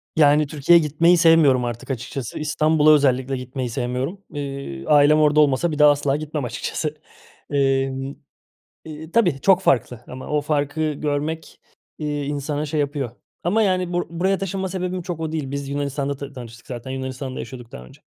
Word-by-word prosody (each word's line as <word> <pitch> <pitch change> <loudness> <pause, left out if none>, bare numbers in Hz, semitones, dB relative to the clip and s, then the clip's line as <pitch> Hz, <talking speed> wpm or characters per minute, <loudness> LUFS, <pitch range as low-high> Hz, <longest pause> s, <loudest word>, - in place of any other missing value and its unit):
Yani, 150 -1 +4
Türkiye'ye 155 +4 +4
gitmeyi 170 +4 +4
sevmiyorum 160 -7 +5
artık 120 +3 -5
açıkçası. 125 +1 -5
İstanbul'a 155 0 +3
özellikle 135 -2 +2
gitmeyi 125 0 -5
sevmiyorum. 125 - -3
Iıı, 140 - -6
ailem 150 +1 +5
orada 150 0 +4
olmasa 150 +3 +3
bir 150 - -4
daha 150 0 +8
asla 145 -1 0
gitmem 150 -3 -4
açıkçası. 150 +5 -3 0.5
Emm, 135 -1 0 0.7
eee, 155 +1 -9
tabii 175 -12 +2
çok 190 -1 +4
farklı 125 -4 +1
ama 130 +1 -8
o 150 0 +1
farkı 150 +1 -1
görmek, 150 +2 -3 0.4
eee, 145 -2 -3
insana 145 +1 -2
şey 150 +1 -1
yapıyor. 140 -4 -2 0.3
Ama, 210 +6 +2
yani, 185 -3 0
bur 175 - 0
buraya 185 +3 0
taşınma 195 0 -3
sebebim 180 0 -3
çok 170 -2 -5
o 160 -1 -3
değil. 145 -4 -3
Biz 140 0 -4
Yunanistan'da 140 0 -2
ta 140 +1 -8
tanıştık 115 -3 -11
zaten. 125 0 -7
Yunanistan'da 130 0 -5
yaşıyorduk 120 -3 -9
daha 60 - -9
önce. 65 - -17
145 Hz, 165 wpm, -22 LUFS, 135-160 Hz, 0.7 s, daha